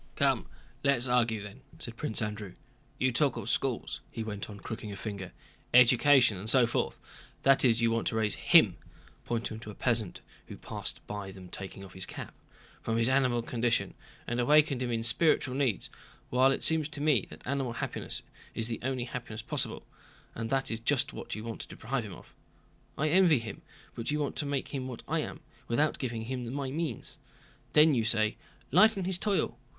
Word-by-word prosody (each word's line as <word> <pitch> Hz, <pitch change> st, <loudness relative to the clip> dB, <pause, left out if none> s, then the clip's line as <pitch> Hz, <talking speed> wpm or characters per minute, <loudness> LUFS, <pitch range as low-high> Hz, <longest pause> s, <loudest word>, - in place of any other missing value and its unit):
"Come, -, -, +2 dB, 0.4 s
let's 140 Hz, -3 st, +3 dB
argue 115 Hz, -4 st, +2 dB
then," 100 Hz, +6 st, -10 dB, 0.2 s
said 115 Hz, -, -6 dB
Prince 110 Hz, -1 st, -1 dB
Andrew, 105 Hz, -3 st, -5 dB, 0.4 s
"You 130 Hz, -, +2 dB
talk 140 Hz, +2 st, +2 dB
of -, -, -2 dB
schools," -, -, -1 dB
he 115 Hz, -, -5 dB
went 105 Hz, -2 st, -5 dB
on, 100 Hz, -1 st, -9 dB
crooking 110 Hz, 0 st, -6 dB
a -, -, -5 dB
finger, 100 Hz, -2 st, -6 dB, 0.4 s
"education 125 Hz, -2 st, +6 dB
and 105 Hz, +4 st, -3 dB
so 125 Hz, 0 st, +6 dB
forth; 115 Hz, -, -1 dB, 0.4 s
that 135 Hz, 0 st, +6 dB
is, 120 Hz, -3 st, +4 dB
you 115 Hz, 0 st, +3 dB
want 115 Hz, 0 st, 0 dB
to -, -, -1 dB
raise 110 Hz, -2 st, +2 dB
him" -, -, +5 dB, 0.5 s
(pointing 115 Hz, -2 st, -2 dB
to 110 Hz, -, -9 dB
a 105 Hz, -, -8 dB
peasant 115 Hz, -6 st, 0 dB, 0.3 s
who -, -, -9 dB
passed -, -, -5 dB
by 105 Hz, -2 st, -5 dB
them 95 Hz, -1 st, -11 dB
taking 100 Hz, +1 st, -6 dB
off 95 Hz, -, -13 dB
his 95 Hz, -1 st, -5 dB
cap) -, -, -7 dB, 0.5 s
"from 115 Hz, 0 st, -1 dB
his 115 Hz, +2 st, +3 dB
animal 130 Hz, -3 st, +2 dB
condition 115 Hz, -4 st, 0 dB, 0.3 s
and 120 Hz, +1 st, -2 dB
awaken 145 Hz, +1 st, +4 dB
in 125 Hz, -, -1 dB
him 115 Hz, -1 st, -1 dB
spiritual 130 Hz, +2 st, +2 dB
needs, 130 Hz, -6 st, 0 dB, 0.4 s
while 130 Hz, +2 st, +5 dB
it -, -, -2 dB
seems 160 Hz, -2 st, +2 dB
to 150 Hz, -, -7 dB
me 145 Hz, -8 st, +2 dB
that -, -, -12 dB
animal 135 Hz, -2 st, -1 dB
happiness -, -, -4 dB, 0.3 s
is 115 Hz, +1 st, 0 dB
the 115 Hz, -, -3 dB
only 130 Hz, 0 st, -1 dB
happiness 120 Hz, -3 st, -6 dB
possible, -, -, -2 dB, 0.5 s
and 115 Hz, 0 st, -4 dB
that 135 Hz, -1 st, 0 dB
is 115 Hz, -, -2 dB
just 135 Hz, +3 st, +1 dB
what -, -, -5 dB
you 110 Hz, -, -6 dB
want 115 Hz, -1 st, -5 dB
to -, -, -7 dB
deprive 125 Hz, +2 st, -3 dB
him 100 Hz, -4 st, -8 dB
of. -, -, -16 dB, 0.6 s
I 155 Hz, +1 st, +1 dB
envy 175 Hz, -2 st, +5 dB
him, 115 Hz, -3 st, -6 dB, 0.3 s
but 115 Hz, -, -4 dB
you 150 Hz, -, +1 dB
want 145 Hz, -2 st, -2 dB
to 145 Hz, -, -1 dB
make 140 Hz, -1 st, -2 dB
him 130 Hz, -2 st, -4 dB
what 125 Hz, -3 st, -7 dB
I -, -, 0 dB
am, -, -, -5 dB, 0.3 s
without 145 Hz, +6 st, +1 dB
giving 115 Hz, -4 st, -3 dB
him 125 Hz, 0 st, -4 dB
my 135 Hz, -1 st, -3 dB
means. 160 Hz, +2 st, -4 dB, 0.5 s
Then 150 Hz, 0 st, +7 dB
you 120 Hz, -4 st, +2 dB
say, 110 Hz, -1 st, +2 dB, 0.4 s
'lighten 195 Hz, -, +5 dB
his 185 Hz, -1 st, +1 dB
toil. 195 Hz, -, 0 dB
120 Hz, 195 wpm, -30 LUFS, 110-135 Hz, 0.6 s, Then